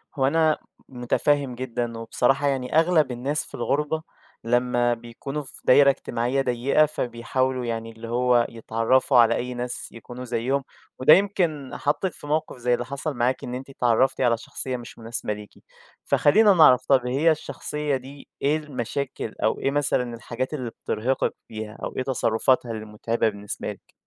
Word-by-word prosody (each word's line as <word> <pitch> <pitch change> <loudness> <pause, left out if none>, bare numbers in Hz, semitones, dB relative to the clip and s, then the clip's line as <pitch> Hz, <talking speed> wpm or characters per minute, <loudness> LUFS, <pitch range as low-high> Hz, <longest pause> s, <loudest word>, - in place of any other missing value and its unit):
هو 135 -1 +2
أنا 160 +1 +3 0.3
مُتفهم 130 +1 0
جدًا، 120 -2 -3
وبصراحة 125 +5 +1
يعني 130 0 -1
أغلب 160 -6 +3
الناس 135 +5 -2
في - - -11
الغُربة 150 +3 -1 0.4
لمّا 120 0 +2
بيكونوا 120 +5 -6
في 130 - -13
دايرة 140 +2 +7
اجتماعية 130 0 0
ضيّقة، 130 +4 +2
فبيحاولوا 125 -1 -2
يعني 115 -1 -3
اللي 115 +1 -10
هو 120 0 +3
يتعرفوا 115 +4 +1
على 115 -1 +6
أي 125 +1 -3
ناس 125 0 -5
يكونوا 120 +2 -9
زَيِّهم، 125 +3 -1 0.4
وده 130 +4 +8
يمكن 175 -8 +1
حطِّك 165 +5 0
في 145 - -11
موقف 155 -2 -1
زي 125 0 +1
اللي 120 0 -1
حصل 140 +3 -4
معاكِ، 125 +1 0
إن 125 - -4
أنتِ 130 +2 -7
اتعرّفتِ 130 +1 +2
على 120 -2 +3
شخصية 130 +2 -5
مش 120 - -11
مُناسبة 115 -2 -4
ليكِ، 105 0 -10 0.5
فخلّينا 205 +7 +5
نعرف، 140 -8 +6
طب 130 -3 +3
هي 145 +6 +3
الشخصية 150 0 -3
دي 135 +2 -9
إيه 145 +3 +2
المشاكل، 135 -4 -4
أو 110 - +1
إيه 135 - 0
مثلًا 135 -4 0
الحاجات 125 +4 -4
اللي 130 -6 -3
بترهقِك 125 +5 0
فيها، 110 0 -7
أو - - -4
إيه 130 - 0
تصرُّفاتها 125 -1 +1
اللي 110 -1 -5
مُتعبة 110 +1 -1
بالنسبة 105 0 -6
لِك؟ - - -15
125 Hz, 160 wpm, -24 LUFS, 120-140 Hz, 0.5 s, وده